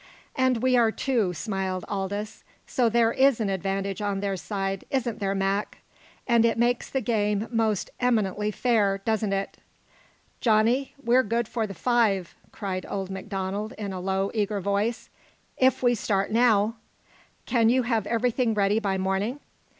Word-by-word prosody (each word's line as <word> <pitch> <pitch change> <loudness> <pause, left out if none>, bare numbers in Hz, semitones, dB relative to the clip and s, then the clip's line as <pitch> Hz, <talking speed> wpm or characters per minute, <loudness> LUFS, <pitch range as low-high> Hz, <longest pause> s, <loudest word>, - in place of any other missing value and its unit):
"And 260 -3 +1
we 255 0 +4
are 230 -2 +4
two," 230 -7 0
smiled 190 -2 -3
Aldous. 205 +2 -4 0.2
"So 245 -3 +1
there 230 0 +3
is 270 -2 +4
an 210 -3 0
advantage 195 +1 -2
on 200 -1 -1
their 200 -1 -1
side, 195 0 -3
isn't 245 -5 -1
there, 195 -1 -1
Mac? 195 +2 -1 0.5
And 235 -2 +4
it 230 0 +2
makes 240 +1 +1
the 265 - -1
game 210 -2 0
most 220 -4 0
eminently 210 -4 +1
fair, 210 -3 +1
doesn't 220 -2 0
it?" 195 0 -2 0.8
"Johnny, 230 +4 +2
we're 245 +1 +4
good 230 0 -1
for 225 -2 -2
the 195 - -8
five!" 210 -5 +1 0.2
cried 190 -3 -4
old 195 -1 -4
Donald 200 +3 -3
in 205 -4 -5
a 185 - -4
low, 190 +1 -1
eager 210 -2 0
voice. 200 +4 -1 0.4
"If 260 0 +2
we 245 -1 +4
start 200 -3 -1
now 225 -1 +3 0.3
" - - -32
"Can 230 -3 +3
you 255 +1 +3
have 225 -4 0
everything 235 0 +1
ready 205 +1 +2
by 195 -3 -1
morning?" 195 +7 -1
215 Hz, 160 wpm, -26 LUFS, 195-235 Hz, 0.8 s, we